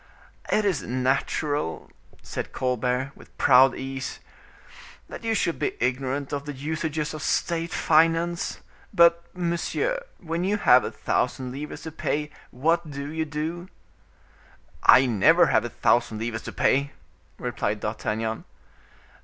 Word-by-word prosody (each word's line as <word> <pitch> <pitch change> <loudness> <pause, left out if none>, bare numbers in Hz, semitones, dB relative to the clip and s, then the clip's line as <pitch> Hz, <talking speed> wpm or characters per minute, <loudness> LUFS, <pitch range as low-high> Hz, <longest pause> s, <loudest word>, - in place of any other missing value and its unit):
"It 215 - +2
is 190 -7 +1
natural," 130 - -1 0.3
said - - -5
Colbert 125 +1 -1
with - - -16
a - - -32
proud 130 0 +5
ease, 135 0 -5 0.9
"that - - -9
you 225 -1 0
should 170 -4 0
be 150 - -2
ignorant 130 +3 -1
of 140 0 -3
the 145 - -5
usages 155 +2 -3
of 155 - -6
state 165 +1 -1
finance; 165 +2 +2 0.3
but, 170 0 +5
monsieur, 180 - -1
when 165 0 -3
you 200 +3 +1
have 125 -10 +6
a - - -2
thousand 130 -1 -1
livres 145 +4 -7
to 160 - -6
pay, 150 -1 -2 0.2
what 165 +5 0
do 140 0 -6
you 160 0 -2
do?" 160 +4 -4 1.1
"I 130 - +7
never 110 -6 +5
have - - +3
a - - -3
thousand 115 -2 +1
livres 115 0 -3
to - - -5
pay," 140 +1 +1 0.4
replied 105 +1 -2
D'Artagnan. 110 +1 -3
145 Hz, 135 wpm, -25 LUFS, 130-165 Hz, 1.1 s, I